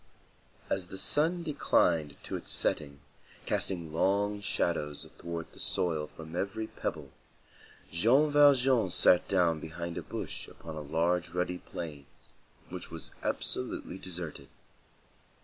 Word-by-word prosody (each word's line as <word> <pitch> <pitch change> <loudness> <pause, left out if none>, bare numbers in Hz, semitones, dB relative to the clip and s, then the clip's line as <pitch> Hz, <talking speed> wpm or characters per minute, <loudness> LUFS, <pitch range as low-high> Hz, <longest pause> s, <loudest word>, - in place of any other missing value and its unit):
As 95 -2 -1
the 95 - -7
sun 165 - +3
declined 85 - +2
to - - -4
its - - -4
setting, 70 -2 +1 0.4
casting 85 -4 0
long 100 +4 +2
shadows 75 -7 0
athwart 85 -1 -6
the - - -14
soil 80 -4 0
from 80 +1 -10
every 100 +4 -2
pebble, - - -5 0.8
Jean 125 - +4
Valjean 135 -7 +5
sat 90 +1 +5
down 85 -4 +3
behind 85 +2 -5
a - - -5
bush - - -5
upon 80 -1 -9
a 75 - -4
large 85 +4 +1
ruddy 90 +1 -1
plain, 75 -5 -7 0.6
which - - -7
was - - -4
absolutely 95 - -2
deserted. 85 -7 -5
90 Hz, 125 wpm, -31 LUFS, 80-100 Hz, 0.8 s, Valjean